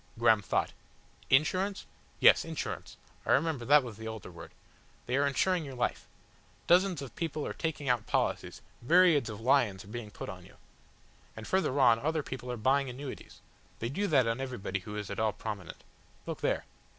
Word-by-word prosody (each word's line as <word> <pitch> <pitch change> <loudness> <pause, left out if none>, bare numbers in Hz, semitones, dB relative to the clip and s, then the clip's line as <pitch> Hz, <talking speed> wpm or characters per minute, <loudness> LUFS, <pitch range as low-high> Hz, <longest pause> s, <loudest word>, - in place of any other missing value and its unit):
Graham 115 -2 +4
thought. 95 - -1 0.6
"Insurance?" 185 +9 +2 0.3
"Yes - - +7
Insurance. 160 -4 -5 0.3
I - - +2
remember 145 -4 +1
that 145 +2 +6
was 115 -4 -8
the 110 0 -7
older 110 -3 -7
word. - - -11 0.6
They 125 - -1
are 140 +1 +3
insuring 175 +5 +1
your 135 -3 -8
life. 125 - -2 0.6
Dozands 180 -4 +3
of 135 - -10
people 155 -3 -3
are - - -4
taking 150 -4 -3
out 120 -4 +1
policies, - - -1 0.2
myriads 160 -2 +4
of 105 -1 -7
lions 115 -6 +2
are - - -14
being 115 -1 -6
put - - -8
on - - -8
you. - - -17 0.8
And 110 - -8
further 185 -7 +1
on 120 -4 +6
other 155 +3 -1
people 125 -2 -6
are 125 - -4
buying 135 +4 +2
annuities. 130 +2 -8 0.4
They 115 - -3
do 200 +10 -1
that 135 -7 +4
on 115 +3 -1
everybody 110 -7 -3
who 105 +3 -8
is 105 -2 -5
at 100 - -4
all 110 -1 +1
prominent. 105 -6 -7 0.4
Look - - -5
there!" - - 0
130 Hz, 185 wpm, -30 LUFS, 110-150 Hz, 0.8 s, Yes